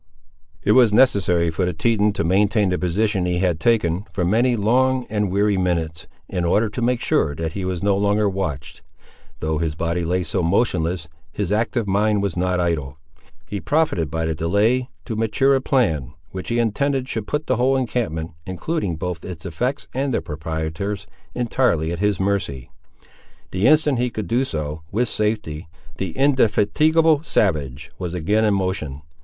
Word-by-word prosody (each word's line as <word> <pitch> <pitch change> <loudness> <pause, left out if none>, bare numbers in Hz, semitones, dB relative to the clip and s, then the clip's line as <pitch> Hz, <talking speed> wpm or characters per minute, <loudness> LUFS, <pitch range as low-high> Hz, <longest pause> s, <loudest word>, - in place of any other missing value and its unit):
It 105 - +3
was 120 -1 +6
necessary 95 -8 +3
for 85 +4 -1
the 90 0 0
Teton 105 +2 +2
to 100 - -1
maintain 100 +3 +2
the 90 - 0
position 95 +1 0
he 90 0 0
had 90 -3 +1
taken, 95 -3 +1
for 90 - -2
many 120 +7 +3
long 125 +4 +2
and 105 -2 0
weary 100 +1 +2
minutes, 85 -3 -1 0.2
in 90 -3 -2
order 105 +6 +2
to 120 - -5
make 120 0 +1
sure 70 - +1
that 80 +1 -3
he 100 - -4
was 90 -1 -3
no 100 -1 +3
longer 105 +1 +2
watched. 90 -7 -4 0.6
Though 80 -1 -1
his 80 -2 -1
body 85 +1 -1
lay 90 +2 0
so 80 +2 -1
motionless, 85 -3 0 0.2
his 100 +1 -3
active 115 +1 0
mind 105 +1 +2
was 100 -4 -1
not 90 0 0
idle. 75 -6 -1 0.5
He 100 -2 -5
profited 145 - +1
by 80 +2 -2
the 80 - 0
delay 105 - +1 0.2
to 115 - -4
mature 115 +5 +2
a 135 - +2
plan 80 - 0 0.2
which 95 -1 -6
he 120 - 0
intended 130 +4 0
should 110 -5 -4
put 150 +1 -2
the 130 - +1
whole 130 +2 +3
encampment, 110 -11 -2 0.2
including 95 - -2
both 85 +1 -4
its 90 -2 -8
effects 125 - -2
and 135 +1 -1
their - - +1
proprietors, 80 +5 -4 0.3
entirely 115 -10 +1
at 85 - -4
his 105 -2 +1
mercy. 95 -10 -2 0.8
The 95 +5 +2
instant 150 -3 +4
he 125 0 +1
could 110 -2 -4
do 125 +7 +1
so 75 - -4
with 120 +3 0
safety, 105 -7 -2 0.3
the 95 -4 -4
indefatigable 145 +5 +3
savage 75 - -1
was 90 -1 -4
again 105 +6 +1
in 105 -2 +3
motion. 80 -7 -3
100 Hz, 175 wpm, -22 LUFS, 85-115 Hz, 0.8 s, was